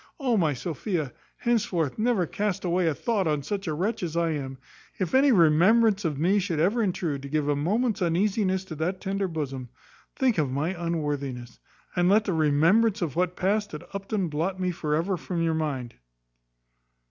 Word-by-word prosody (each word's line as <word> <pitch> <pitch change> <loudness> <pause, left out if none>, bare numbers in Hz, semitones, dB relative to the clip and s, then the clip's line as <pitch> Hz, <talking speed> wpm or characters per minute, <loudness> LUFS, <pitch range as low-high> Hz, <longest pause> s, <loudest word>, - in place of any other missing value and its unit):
O 255 -5 +1
my 165 -7 +2
Sophia! 160 - -3 0.2
henceforth 195 - 0
never 220 -5 +2
cast 200 +2 -2
away 175 0 +1
a 155 - +1
thought 210 - 0
on 150 -2 0
such 195 +3 -4
a 155 - 0
wretch 195 +9 -1
as 170 -2 -3
I 170 -1 +1
am. 135 -3 -4 0.4
If 185 -4 -2
any 270 +1 +5
remembrance 195 +4 +4
of 150 -4 -1
me 185 +7 +3
should 180 -5 -2
ever 200 +9 +2
intrude 175 -8 -1
to 140 - -8
give 150 0 0
a 145 - +2
moment's 210 - 0
uneasiness 190 +2 +1
to 165 - -7
that 180 +4 -2
tender 195 0 -2
bosom, 135 -7 -4 0.5
think 250 -8 +2
of 145 -3 +1
my 140 +5 -1
unworthiness; 145 -8 -3 0.4
and 175 0 +3
let 210 +2 +4
the 190 - 0
remembrance 170 +8 +3
of 150 -6 -3
what 180 0 0
passed 205 -1 0
at 150 - -9
Upton 195 -1 -2
blot 165 +5 -2
me 185 -1 0
for 150 -3 -1
ever 180 +4 0
from 170 -1 -3
your 165 -1 +1
mind." 140 -7 -3
175 Hz, 185 wpm, -26 LUFS, 155-200 Hz, 0.5 s, any